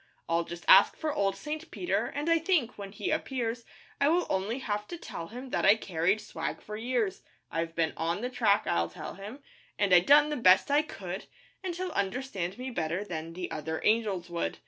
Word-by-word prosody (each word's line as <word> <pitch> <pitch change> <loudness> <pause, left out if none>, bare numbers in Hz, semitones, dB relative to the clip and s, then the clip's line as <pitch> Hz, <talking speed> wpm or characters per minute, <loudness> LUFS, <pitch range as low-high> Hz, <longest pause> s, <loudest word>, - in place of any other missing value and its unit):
I'll 165 0 +1
just 170 0 -8
ask 195 - +7
for 310 -2 -2
old 195 -4 +1
St. 305 +10 -6
Peter, 360 - -1
And 290 +2 -4
I 330 0 +4
think, 320 -8 +1
when 200 -1 -8
he 200 - -3
appears, 245 -6 -2 0.3
I 280 - +4
will 350 +2 +3
only 195 +5 0
have 210 -5 -3
to 345 - -6
tell 165 - -7
him 250 +5 -9
That - - 0
I 205 - +7
carried 185 -1 0
swag 210 - -5
for 210 - -8
years. 225 -3 -1 0.3
'I've 165 0 -2
been 165 -2 +1
on 170 +4 -1
the 250 - -2
track,' 215 -4 +3
I'll 85 0 +1
tell 85 - -7
him, 210 - -9 0.3
'An' 200 -3 +2
I 180 - +10
done 290 +11 +6
the 300 - -2
best 190 +3 +5
I 290 +1 +5
could,' 190 -10 -7 0.4
And 365 -2 -3
he'll 365 0 -3
understand 200 - -2
me 255 +1 -5
better 170 -2 -2
Than 165 -4 -6
the 180 0 -5
other 160 +1 -3
angels 210 -5 +1
would. 170 - -2
210 Hz, 210 wpm, -29 LUFS, 180-265 Hz, 0.4 s, I